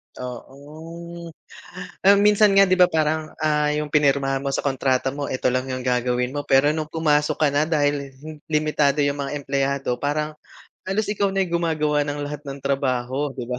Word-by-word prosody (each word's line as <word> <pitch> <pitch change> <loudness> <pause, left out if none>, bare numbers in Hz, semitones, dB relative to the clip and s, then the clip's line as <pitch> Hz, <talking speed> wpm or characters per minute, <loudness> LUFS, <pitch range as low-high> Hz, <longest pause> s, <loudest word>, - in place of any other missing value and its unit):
Oo. 160 +7 -9 0.7
Ah, 200 +1 +6
minsan 210 +1 +5
nga 195 - +8
'di 185 - -1
ba 180 - +7
parang, 155 0 -1
ah, 150 -1 +2
yung 150 -1 -4
pinirmahan 140 -2 +2
mo 140 - -3
sa 135 - -2
kontrata 135 -1 0
mo 145 0 -4
'eto 130 -1 0
lang 130 +1 -1
yung 130 -1 -4
gagawin 125 0 0
mo, 145 0 -3
pero 135 +2 +4
nung 155 -1 -4
pumasok 155 -1 +1
ka 155 - +2
na 145 +1 +2
dahil 145 -3 0
hin 155 +3 -10
limitado 150 -2 +1
yung 140 0 -1
mga 140 +1 -3
empleyado 135 -2 -2
parang 150 +1 -1 0.6
halos 200 +2 0
ikaw 200 -1 0
na 195 0 +1
yung 170 -1 -2
gumagawa 150 -3 +1
ng 145 0 -3
lahat 145 0 -6
ng 135 0 -6
trabaho, 135 0 -1
'di 125 - -4
ba? 125 0 -4
145 Hz, 185 wpm, -22 LUFS, 135-155 Hz, 0.7 s, nga